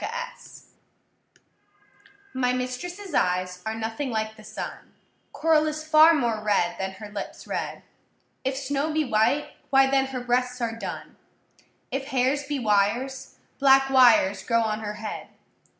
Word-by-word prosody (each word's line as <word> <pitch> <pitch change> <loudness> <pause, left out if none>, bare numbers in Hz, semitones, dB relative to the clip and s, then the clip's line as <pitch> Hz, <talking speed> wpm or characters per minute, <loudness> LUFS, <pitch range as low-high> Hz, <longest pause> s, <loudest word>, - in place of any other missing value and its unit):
CXXX 485 +1 -7 1.7
My 250 -1 +1
mistress’ 335 +10 -5
eyes 180 -2 0
are 220 - -2
nothing 225 +5 -3
like 220 -1 -2
the 215 - -15
sun; - - -8 0.4
Coral 315 -1 +2
is 310 0 -3
far 315 +1 +7
more 235 -6 0
red, 200 -4 +1
than 190 0 -3
her 210 +2 -10
lips 205 - -7
red: - - -4 0.6
If 265 0 -1
snow 280 +3 -1
be 310 0 +1
white, 245 +5 +1 0.2
why 270 0 +4
then 270 -1 +3
her 260 -2 -5
breasts 250 +1 0
are 230 -2 -2
dun; 230 - -7 0.7
If 270 +1 -2
hairs 270 +1 0
be 290 -1 -2
wires, 240 +4 0 0.2
black 270 -1 +5
wires 235 -7 +5
grow 230 -1 +1
on 215 -1 -1
her 210 -1 -5
head. 215 0 -6
255 Hz, 145 wpm, -25 LUFS, 220-280 Hz, 1.7 s, far